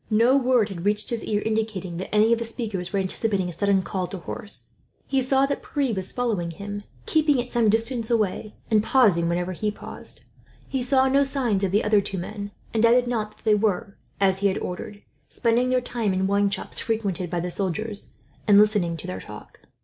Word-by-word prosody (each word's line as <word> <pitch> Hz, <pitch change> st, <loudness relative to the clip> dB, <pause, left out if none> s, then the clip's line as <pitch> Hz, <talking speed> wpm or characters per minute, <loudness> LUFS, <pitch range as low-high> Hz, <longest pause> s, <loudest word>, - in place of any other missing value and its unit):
No 230 Hz, +4 st, +4 dB
word 250 Hz, -5 st, +3 dB
had 175 Hz, -4 st, -6 dB
reached 210 Hz, +2 st, +1 dB
his 235 Hz, -2 st, -2 dB
ear 210 Hz, -1 st, 0 dB
indicating 215 Hz, -5 st, -2 dB
that 185 Hz, -, -5 dB
any 215 Hz, +2 st, +4 dB
of 230 Hz, -, +1 dB
the -, -, -1 dB
speakers 215 Hz, -6 st, -4 dB
were -, -, -1 dB
anticipating 190 Hz, 0 st, -1 dB
a -, -, -6 dB
sudden 200 Hz, +1 st, +2 dB
call 185 Hz, -1 st, -3 dB
to 195 Hz, -, -6 dB
horse. 205 Hz, +4 st, -5 dB, 0.3 s
He 270 Hz, -1 st, +1 dB
saw 265 Hz, +1 st, +3 dB
that 280 Hz, -, -2 dB
Pierre 275 Hz, -5 st, -1 dB
was 190 Hz, -2 st, -3 dB
following 220 Hz, -9 st, -1 dB
him, 205 Hz, +5 st, -6 dB, 0.2 s
keeping 305 Hz, -4 st, +3 dB
at 245 Hz, +1 st, -4 dB
some 235 Hz, -3 st, +3 dB
distance 230 Hz, +2 st, +1 dB
away, 215 Hz, -2 st, 0 dB, 0.2 s
and 215 Hz, -1 st, +5 dB
pausing 205 Hz, -9 st, +3 dB
whenever 175 Hz, +1 st, -1 dB
he 210 Hz, +4 st, -2 dB
paused. 210 Hz, -, -9 dB, 0.4 s
He 265 Hz, -, -2 dB
saw 260 Hz, +1 st, +3 dB
no 275 Hz, +2 st, +4 dB
signs 250 Hz, -8 st, 0 dB
of 190 Hz, -, +1 dB
the 205 Hz, +3 st, +2 dB
other 210 Hz, -1 st, +4 dB
two 195 Hz, 0 st, -4 dB
men, 200 Hz, +3 st, -5 dB, 0.2 s
and 225 Hz, -, +1 dB
doubted 240 Hz, +2 st, +5 dB
not 220 Hz, -3 st, -3 dB
that -, -, -26 dB
they 215 Hz, -, +5 dB
were, 205 Hz, -2 st, 0 dB, 0.2 s
as 190 Hz, -1 st, +2 dB
he 200 Hz, -, +3 dB
had 190 Hz, -, 0 dB
ordered, 200 Hz, +3 st, -6 dB, 0.3 s
spending 240 Hz, +1 st, +1 dB
their 255 Hz, 0 st, +2 dB
time 230 Hz, -5 st, -1 dB
in 190 Hz, +1 st, +1 dB
wine 200 Hz, +1 st, +2 dB
shops 195 Hz, -1 st, -2 dB
frequented 200 Hz, -6 st, -2 dB
by 175 Hz, 0 st, -1 dB
the 175 Hz, +1 st, -3 dB
soldiers, 205 Hz, +3 st, -2 dB, 0.4 s
and 205 Hz, -1 st, +7 dB
listening 205 Hz, -5 st, +3 dB
to -, -, -5 dB
their 90 Hz, +1 st, -5 dB
talk. -, -, -12 dB
210 Hz, 210 wpm, -24 LUFS, 190-235 Hz, 0.4 s, and